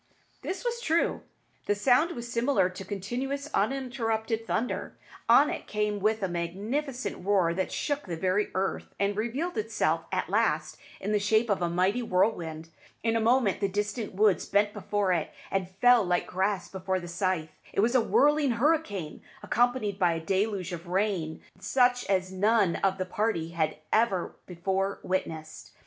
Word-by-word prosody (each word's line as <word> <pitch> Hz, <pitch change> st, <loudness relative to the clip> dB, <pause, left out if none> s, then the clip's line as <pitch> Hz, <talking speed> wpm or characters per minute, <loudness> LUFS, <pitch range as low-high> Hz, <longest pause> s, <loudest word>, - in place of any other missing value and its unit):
This 385 Hz, +6 st, -5 dB
was 475 Hz, 0 st, -1 dB
true. 330 Hz, -5 st, +1 dB, 0.5 s
The 205 Hz, -, +2 dB
sound 260 Hz, +10 st, +3 dB
was 235 Hz, -1 st, -6 dB
similar 235 Hz, -5 st, +2 dB
to 185 Hz, +1 st, -8 dB
continuous, 255 Hz, +10 st, -4 dB
uninterrupted 225 Hz, -2 st, -1 dB
thunder. 250 Hz, -, -2 dB, 0.3 s
On -, -, +7 dB
it -, -, -6 dB
came 210 Hz, -1 st, -1 dB
with 215 Hz, +1 st, +1 dB
a -, -, +2 dB
magnificent 200 Hz, -, -3 dB
roar 185 Hz, -4 st, +2 dB
that 190 Hz, +2 st, -2 dB
shook 290 Hz, -6 st, -2 dB
the 170 Hz, -2 st, -4 dB
very 185 Hz, +4 st, +1 dB
earth, 190 Hz, +1 st, -2 dB
and 200 Hz, 0 st, +1 dB
revealed 245 Hz, -, -2 dB
itself 185 Hz, -7 st, 0 dB
at 185 Hz, -1 st, -1 dB
last 180 Hz, -7 st, 0 dB, 0.2 s
in 200 Hz, -, -3 dB
the 210 Hz, -, +3 dB
shape 220 Hz, +2 st, +2 dB
of 195 Hz, -, +1 dB
a 175 Hz, -, +1 dB
mighty 185 Hz, +7 st, +1 dB
whirlwind. 175 Hz, -6 st, 0 dB, 0.3 s
In 225 Hz, 0 st, +1 dB
a -, -, +3 dB
moment 230 Hz, -2 st, +2 dB
the 200 Hz, -, +1 dB
distant 205 Hz, +1 st, -3 dB
woods 205 Hz, -4 st, +3 dB
bent 205 Hz, +1 st, +2 dB
before 205 Hz, -3 st, 0 dB
it, 165 Hz, -3 st, -1 dB, 0.2 s
and 190 Hz, -2 st, -1 dB
fell 235 Hz, +5 st, +5 dB
like 180 Hz, -1 st, +1 dB
grass 190 Hz, +1 st, -1 dB
before 190 Hz, 0 st, -2 dB
the 175 Hz, -, -8 dB
scythe. 170 Hz, -3 st, -2 dB, 0.2 s
It -, -, +1 dB
was 235 Hz, +3 st, +2 dB
a 255 Hz, -, +5 dB
whirling 290 Hz, +2 st, +3 dB
hurricane, 230 Hz, -, 0 dB, 0.2 s
accompanied 240 Hz, -4 st, +1 dB
by 175 Hz, -2 st, +3 dB
a 165 Hz, -, -2 dB
deluge 190 Hz, +1 st, -1 dB
of 170 Hz, +1 st, -7 dB
rain 180 Hz, -4 st, -1 dB, 0.2 s
such 245 Hz, -1 st, +2 dB
as 185 Hz, -1 st, 0 dB
none 200 Hz, -1 st, +3 dB
of 190 Hz, -1 st, +1 dB
the 185 Hz, -, -2 dB
party 185 Hz, -4 st, -1 dB
had 160 Hz, -2 st, -1 dB, 0.2 s
ever 215 Hz, -5 st, +2 dB
before 190 Hz, +2 st, -1 dB
witnessed. 160 Hz, -4 st, -4 dB
205 Hz, 165 wpm, -28 LUFS, 185-235 Hz, 0.5 s, On